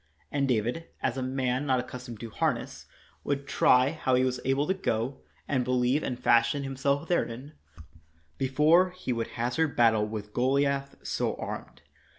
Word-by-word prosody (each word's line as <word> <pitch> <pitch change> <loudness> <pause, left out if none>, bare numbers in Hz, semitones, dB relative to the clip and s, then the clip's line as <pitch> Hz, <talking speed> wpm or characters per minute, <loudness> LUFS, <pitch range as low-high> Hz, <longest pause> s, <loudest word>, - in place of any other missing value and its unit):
And 140 -1 +1
David, 125 +7 -1 0.2
as - - 0
a 130 - -3
man 130 +1 -1
not 130 -2 +3
accustomed 125 -2 -7
to 115 -2 -7
harness, - - -2 0.4
would 140 -1 -2
try 130 -1 +4
how 130 -5 0
he 130 - +3
was 130 -1 0
able 135 +2 +1
to 190 - +1
go, 130 - -2 0.3
and 130 -3 +1
believe 125 +3 +1
and 125 -4 -3
fashion 120 +3 +3
himself 140 +3 -1
therein, 140 -4 -2 0.9
before 150 +7 +4
he 180 -8 -4
would 115 -1 -2
hazard 125 +7 0
battle 110 -3 +4
with 105 -1 -6
Goliath 140 +2 +1
so - - -1
armed. - - -7
130 Hz, 160 wpm, -28 LUFS, 120-140 Hz, 0.9 s, try